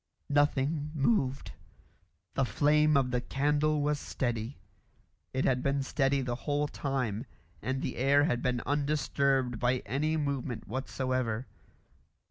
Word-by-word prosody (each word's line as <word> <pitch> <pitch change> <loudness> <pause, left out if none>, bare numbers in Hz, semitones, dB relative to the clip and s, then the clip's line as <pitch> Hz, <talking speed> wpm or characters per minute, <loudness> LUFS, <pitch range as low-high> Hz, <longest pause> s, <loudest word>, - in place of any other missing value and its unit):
Nothing 145 +1 +2
moved. 140 - +1 0.8
The 135 - +1
flame 150 +3 +3
of 130 -2 +1
the 125 0 0
candle 150 +3 +1
was 150 0 +1
steady. 120 -1 -3 0.7
It 130 - 0
had 125 -1 +2
been 140 0 0
steady 135 0 +1
the 125 -2 -2
whole 145 +4 -1
time, 130 -5 -2 0.3
and 130 +1 -2
the - - -3
air 140 +3 +4
had 125 -5 +1
been 125 -2 0
undisturbed 140 -4 +1
by 125 +1 +1
any 155 +5 0
movement 140 -5 -3
whatsoever. 130 -1 -2
135 Hz, 125 wpm, -30 LUFS, 125-145 Hz, 0.8 s, air